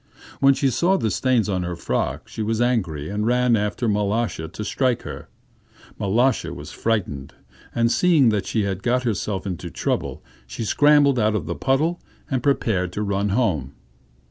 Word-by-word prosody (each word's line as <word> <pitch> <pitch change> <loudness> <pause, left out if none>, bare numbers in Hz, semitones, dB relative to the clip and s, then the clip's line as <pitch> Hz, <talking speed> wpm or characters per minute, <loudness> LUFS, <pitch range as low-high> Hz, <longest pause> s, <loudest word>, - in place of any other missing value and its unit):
When 135 0 +5
she 135 0 +1
saw 180 +10 +2
the 110 - -1
stains 125 +1 +1
on 95 -3 -1
her 90 0 -3
frock, 85 - -2
she - - -6
was 110 +1 -1
angry 95 -12 0
and 105 +2 -2
ran 125 +1 +3
after 105 +3 -1
Mal√°sha 105 -5 -1
to 105 - -6
strike 125 +2 0
her. - - -8 0.7
Mal√°sha 120 +7 +1
was - - -9
frightened, 90 -12 -2 0.4
and 115 0 +2
seeing 160 -8 +4
that 105 -3 -1
she 110 - 0
had 95 -1 -2
got 125 +4 +1
herself 105 -4 -2
into 90 -2 -4
trouble, - - -3 0.2
she 90 - -5
scrambled 145 +1 +4
out 110 -1 +2
of - - -2
the - - -3
puddle, 155 +6 0 0.3
and 130 -2 0
prepared 110 -9 +1
to 105 - -2
run 100 0 0
home. 95 - 0
110 Hz, 170 wpm, -22 LUFS, 100-125 Hz, 0.7 s, When